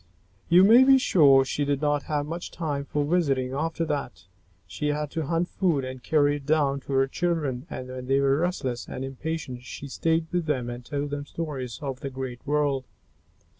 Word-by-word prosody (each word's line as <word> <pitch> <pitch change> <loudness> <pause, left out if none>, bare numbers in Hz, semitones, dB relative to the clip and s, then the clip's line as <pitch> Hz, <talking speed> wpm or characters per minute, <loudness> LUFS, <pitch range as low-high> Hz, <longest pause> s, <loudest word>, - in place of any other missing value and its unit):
You 180 +2 +7
may 230 +6 +8
be 270 0 +7
sure 140 - +5
she 145 - -1
did 140 -1 0
not 145 -1 +1
have 145 -1 0
much 170 +3 -5
time 145 -4 -3
for 145 0 -1
visiting 140 -6 +1
after 165 +3 -1
that. 145 -5 -4 0.4
She 150 - -4
had 150 0 -1
to 160 -3 -3
hunt 170 +2 0
food 165 -10 0
and 130 0 -7
carry 145 -1 +2
it 140 - -12
down 145 -3 +2
to 135 - -7
her 135 0 +4
children, 150 -3 -2
and 130 - -6
when 130 0 -7
they 135 +1 +3
were 140 0 +3
restless 135 -9 -2
and 130 - -5
impatient 135 -1 -5
she 135 +3 -8
stayed 160 +4 0
with 175 -2 -1
them 125 -5 -1
and 120 +1 -7
told 145 +2 -3
them 145 0 -4
stories 135 -8 -5
of 135 -3 -4
the 140 - -4
great 130 -2 -6
world. 145 -3 +1
145 Hz, 200 wpm, -26 LUFS, 135-160 Hz, 0.4 s, may